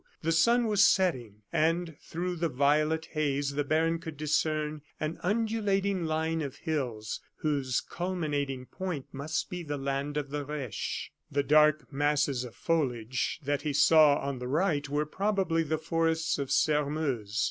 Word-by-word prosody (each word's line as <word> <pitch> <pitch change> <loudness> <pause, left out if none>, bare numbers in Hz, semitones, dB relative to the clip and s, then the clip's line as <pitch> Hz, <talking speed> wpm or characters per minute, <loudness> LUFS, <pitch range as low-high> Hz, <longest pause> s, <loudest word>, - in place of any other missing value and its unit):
The 165 - +1
sun 235 +9 +4
was 210 -2 +4
setting; 120 - +2
and 165 +1 +1
through 175 +2 -4
the 165 0 0
violet 150 +4 +2
haze 145 -2 0
the 145 +1 -1
baron 160 +3 +1
could 160 -3 -8
discern 155 0 0 0.2
an 155 +2 -3
undulating 200 -3 0
line 160 +1 0
of 140 -3 -4
hills, 125 -10 -3 0.2
whose 140 -5 0
culminating 145 -7 -3
point 175 -3 -5
must 150 +3 -3
be 180 -1 -4
the 145 -3 -4
land 140 +2 -2
of 145 -2 -3
the 145 0 -2
Reche. 140 -7 -4 0.2
The 140 0 +1
dark 150 +1 +4
masses 145 -2 +1
of 120 -2 -9
foliage 130 -6 -1
that 145 0 0
he 150 -1 -2
saw 150 0 +6
on 140 -2 -3
the 125 - -5
right 145 -1 +1
were 145 +1 0
probably 190 -1 0
the 160 0 -1
forests 160 0 0
of 140 -2 -3
Sairmeuse. 145 -8 +1
150 Hz, 155 wpm, -29 LUFS, 140-165 Hz, 0.2 s, saw